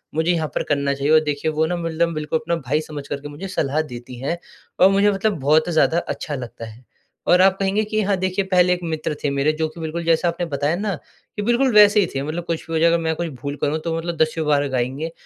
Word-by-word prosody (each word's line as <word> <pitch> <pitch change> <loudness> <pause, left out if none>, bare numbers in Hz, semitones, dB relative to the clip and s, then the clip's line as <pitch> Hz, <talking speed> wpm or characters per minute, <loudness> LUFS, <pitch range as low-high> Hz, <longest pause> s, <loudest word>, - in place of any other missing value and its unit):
मुझे 160 +3 +2
यहाँ 160 -3 0
पर - - 0
करना 140 -1 +1
चाहिए?" 140 +2 -1
और 155 - +8
देखिए, 150 +1 -1
वो 155 +1 +1
ना 175 +2 -1
मतलब 165 0 -1
बिल्कुल 155 +1 -1
अपना 170 +2 -1
भाई 150 0 -1
समझ 145 -2 -8
कर 140 - -4
के 145 - -7
मुझे 145 +7 -7
सलाह 155 -4 0
देती 120 +1 -8
हैं 145 +7 -2 0.4
और 185 - +7
मुझे 200 +1 +3
मतलब 195 -1 0
बहुत 155 +5 +3
ज़्यादा 165 0 +3 0.2
अच्छा 145 - -5
लगता 120 -2 -7
है 110 +3 -13 0.4
और 180 +1 +5
आप 190 0 +4
कहेंगे 195 +2 +1
कि 215 0 -1
हाँ, 200 -1 +1
देखिए, 185 +1 -1
पहले 180 -1 +3
एक 175 - -3
मित्र 160 -2 -3
थे 145 - +1
मेरे, 140 +2 +1
जो 160 0 -1
कि 165 - -13
बिल्कुल 165 +1 -4
जैसा 165 +1 +2
आपने 170 +1 -1
बताया 145 +4 0
ना, 200 +1 -2 0.4
कि 210 - -3
बिल्कुल 240 +3 +2
वैसे 210 0 +7
ही 190 - +3
थे। 135 - -1
मतलब 160 +4 -4
कुछ 165 -2 -3
भी 165 - -6
हो 160 - +1
जाए, 165 - +5
अगर 170 - +3
मैं 160 0 0
कुछ 170 +2 -3
भूल 140 0 -4
करूँ, 150 +2 0
तो 165 0 -3
मतलब 170 0 -4
दसियों 155 0 -2
बार 145 -1 +2
गाएँगे 130 +5 -2
160 Hz, 260 wpm, -21 LUFS, 145-180 Hz, 0.4 s, और